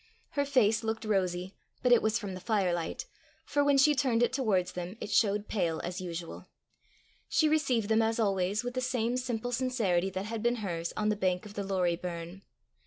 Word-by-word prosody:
Her 285 0 0
face 225 -6 +3
looked 225 0 -2
rosy, 185 -2 0 0.3
but 250 - +3
it 240 - +7
was 220 0 +1
from 200 -3 -5
the 185 - -6
firelight, 180 -5 -1 0.4
for 285 0 +1
when 285 -1 +4
she 295 +2 +6
turned 255 -4 +2
it 240 - +1
towards 210 -9 +1
them, 180 +4 -6
it 210 - -6
showed 205 0 +2
pale 170 -6 -1
as 180 +2 -4
usual. 170 -2 -6 0.8
She 315 - +3
received 270 -8 +1
them, 220 +1 +3
as 225 +1 0
always, 195 0 +1
with 245 0 -4
the 255 - -2
same 250 -2 0
simple 245 -2 -2
sincerity 230 -8 +1
that 190 +1 -4
had 225 0 -4
been 240 +1 +2
hers 170 -2 -3
on 215 0 +1
the 210 - +2
bank 185 -2 0
of 205 - -10
the 205 - -3
Lorrie 180 -3 0
burn. 175 +1 -6
210 Hz, 200 wpm, -30 LUFS, 185-245 Hz, 0.8 s, it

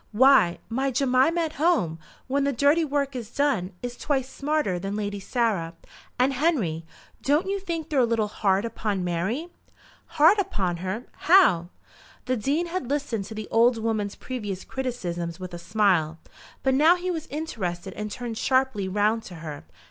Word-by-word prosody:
"Why, 255 -7 +5
my 265 +4 0
Jemima 265 +5 +2
at 320 -2 -2
home, 180 - +2 0.3
when 275 +2 0
the 280 - +2
dirty 285 +6 +3
work 280 -2 -1
is 235 -4 -5
done, 255 -10 0
is 245 0 -4
twice 270 -2 -1
smarter 280 -9 -1
than 195 +2 -4
Lady 205 -1 -3
Sarah. 195 -7 -1 0.4
And, 260 +2 +3
Henry, 230 - 0 0.3
don't 295 +5 +2
you 395 +1 -1
think 335 -5 -5
they're 285 - +2
a - - +5
little 230 -2 +1
hard 200 0 +1
upon 210 -4 -2
Mary?" 190 - -2 0.7
"Hard 325 +8 +6
upon 195 - -1
her; 190 +6 -4 0.2
how?" 215 - +6 0.6
The 255 - 0
Dean 280 +9 0
had 340 -7 -4
listened 275 -8 -1
to 220 - -8
the 215 -1 -5
old 235 +1 +4
woman's 220 -2 -2
previous 205 -7 -5
criticisms 175 -10 -4
with 185 -1 -7
a 170 - -6
smile; 175 -5 +1 0.5
but 265 - +3
now 310 +6 +6
he 365 +1 -3
was 325 -2 -4
interested 195 - -4
and 210 0 -5
turned 230 0 -5
sharply 260 -7 +1
round 210 +4 +1
to 180 - -9
her. 155 -3 -8
235 Hz, 170 wpm, -25 LUFS, 195-285 Hz, 0.7 s, Hard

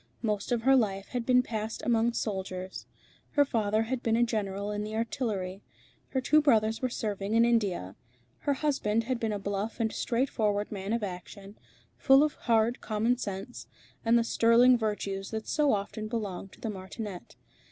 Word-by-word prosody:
Most 210 -1 -1
of 235 -2 +1
her 270 +2 +6
life 195 -6 0
had 245 -2 -3
been 250 -1 +5
passed 220 -2 -4
among 235 0 +2
soldiers. 190 -4 -4 0.5
Her 290 0 +5
father 220 -4 +1
had 245 +2 -3
been 225 -2 +1
a 235 - +4
general 205 -3 -2
in 210 0 -2
the 215 +1 -5
Artillery. 210 -5 -2 0.5
Her 265 - -1
two 305 +4 +4
brothers 225 -6 +3
were 255 - 0
serving 210 -2 -2
in 230 +1 +6
India. 200 - 0 0.4
Her 285 - 0
husband 265 -7 0
had 250 +1 -2
been 225 -2 -1
a 205 - -1
bluff 200 +3 -3
and 220 -1 0
straightforward 215 -4 0
man 195 -1 -4
of 230 -1 0
action, 195 +2 -7 0.4
full 270 +1 +6
of 305 - +1
hard 230 0 +1
commonsense, 215 -1 -2 0.4
and 230 +1 +4
the 235 - +3
sterling 235 +2 +5
virtues 205 -3 -2
that 220 -1 -5
so 295 -2 +2
often 210 +1 -2
belong 205 -5 -4
to - - -18
the 225 - -2
martinet. 190 0 -7
220 Hz, 175 wpm, -29 LUFS, 200-235 Hz, 0.5 s, her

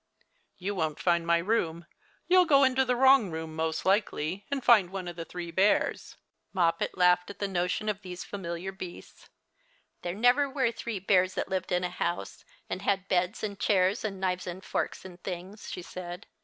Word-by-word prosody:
" - - -41
You 195 +3 -3
won't 160 -5 -2
find 170 -1 +1
my 170 0 +5
room. 170 -3 -1 0.4
You'll 365 0 +6
go 280 -3 +6
into 265 0 +4
the 250 -1 +1
wrong 265 -4 +6
room 160 -1 -5
most 160 0 -2
likely, 190 -2 0
and 280 -2 -2
find 215 -8 +6
one 190 -1 -5
of 175 - -6
the 165 -1 -6
three 175 -1 -6
bears." 190 +5 +1 0.4
Moppet 170 -3 +1
laughed 180 0 +4
at 200 - -8
the 200 - -1
notion 180 +3 -1
of 210 -1 -1
those 180 -2 -7
familiar 185 -1 -5
beasts. 185 -2 -10
'• - - -21 0.7
There 175 +1 -4
never 245 +6 +4
were 265 -4 +1
three 230 -2 -5
bears 185 -1 +2
that - - -2
lived 190 -1 -2
in 180 0 +1
a 180 - 0
house, 175 -1 -3 0.2
and 185 - -4
had 195 -1 0
beds 180 +3 0
and 205 -2 -4
chairs 190 +1 +2
and 200 -3 -3
knives 185 -1 -1
and 180 +2 -6
forks - - -3
and 180 -1 -11
things," 185 +3 -7
she 180 - -6
said. 180 +2 -8
185 Hz, 195 wpm, -29 LUFS, 175-210 Hz, 0.7 s, You'll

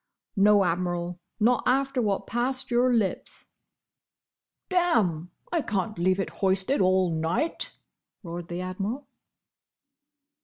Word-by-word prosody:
"No, 205 -1 +5
Admiral. 175 0 -2 0.2
Not 240 +3 +3
after 270 0 +2
what 205 -3 0
passed 255 +2 -2
your 245 +1 +3
lips." 220 -5 -1 1.2
"Damme! 220 - +1 0.2
I 340 -2 +1
can't 215 -4 -2
leave 185 +2 +2
it 195 - -2
hoisted 195 +7 +2
all 185 -1 +3
night!" 170 - -1 0.5
roared 170 -1 -6
the 175 +1 -4
Admiral. 195 +9 -4
195 Hz, 110 wpm, -27 LUFS, 180-245 Hz, 1.2 s, No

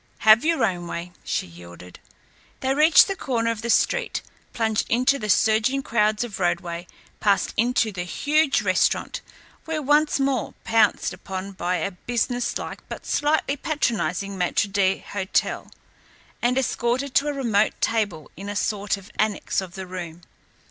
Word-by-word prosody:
"Have 220 +3 +7
your 320 -7 +2
own 175 -4 -3
way," 170 +1 -5
she - - -2
yielded. 85 +1 -13 0.6
They 265 0 +1
reached 305 +3 +6
the 390 - -2
corner 230 -8 -1
of 225 -1 -5
the 235 - -4
street, - - +1 0.3
plunged 220 -2 0
into 255 +4 +2
the 215 - -4
surging 220 +7 +3
crowds 215 -2 +1
of 230 -4 -6
Broadway, 175 -1 -2 0.3
passed 200 -2 +2
into 235 -1 +2
the 185 -3 -5
huge 290 - +1
restaurant, - - +1 0.5
were 320 -1 -1
once 295 +1 +2
more 270 -3 -1
pounced 225 0 +2
upon 190 0 -6
by 180 -1 -2
a 195 - -2
businesslike 245 +5 -3
but - - -7
slightly 290 -1 +1
patronizing 200 - -1
maître 180 +2 +1
d'hôtel, 195 0 -1 0.7
and 245 +2 +2
escorted 260 +1 0
to 285 - +3
a 295 - 0
remote 225 -6 +1
table 205 -9 -1
in 200 +4 -7
a 205 - -4
sort 205 0 -1
of 195 0 -14
annex 210 -2 0
of 180 -2 -9
the 190 -1 -6
room. 175 -2 -7
220 Hz, 150 wpm, -24 LUFS, 190-260 Hz, 0.7 s, Have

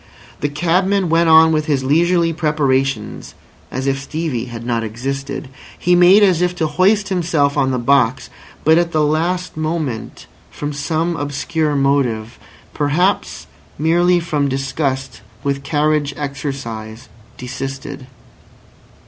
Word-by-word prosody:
The 145 - -1
cabman 180 +5 +1
went 165 +1 +3
on 160 0 +7
with 155 -1 0
his 140 -3 +1
leisurely 165 +4 +2
preparations 135 -7 -1 0.3
as 130 +1 -4
if 135 0 0
Stevie 150 -5 -3
had 120 -2 -8
not 115 -2 -1
existed. 135 +6 -4 0.3
He 180 - +1
made 180 +4 +6
as 180 -4 +3
if 180 0 +1
to 165 - -1
hoist 195 +7 +2
himself 165 -6 +1
on 135 -2 +2
the 130 - 0
box, 130 0 +1 0.3
but 160 +2 +5
at 170 -1 -1
the 155 -1 +2
last 170 +4 -1
moment 155 -7 -4 0.2
from 145 0 -5
some 160 +4 -1
obscure 145 +1 -2
motive, 130 -5 0 0.3
perhaps 165 +7 0 0.3
merely 175 +3 +3
from 150 -4 -1
disgust 135 0 -3 0.2
with 140 -1 -1
carriage 150 0 0
exercise, 135 -6 -6 0.3
desisted. 130 +1 -6
145 Hz, 130 wpm, -18 LUFS, 135-165 Hz, 0.3 s, on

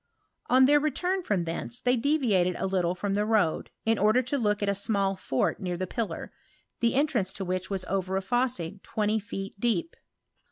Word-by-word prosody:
On 260 +1 +6
their 295 +2 +5
return 355 +6 0
from 205 - 0
thence 170 +8 -4
they 250 0 +2
deviated 230 - +2
a - - -2
little 180 -2 0
from 195 +2 -2
the 205 +1 +1
road, 210 -7 +1 0.2
in 225 -1 +2
order 215 +5 +4
to 270 +4 -1
look 210 -2 +1
at - - 0
a 200 - +2
small 200 -1 0
fort 135 -8 -1
near 180 -2 -3
the 185 - -2
pillar, 225 +3 -4 0.5
the 235 +1 +2
entrance 255 -9 +1
to 195 - -4
which 185 +1 -2
was 190 -2 -2
over 190 0 -1
a - - 0
fosse 205 -5 -1
twenty 215 0 0
feet 195 -1 -7
deep. 240 +10 0
205 Hz, 195 wpm, -28 LUFS, 190-245 Hz, 0.5 s, On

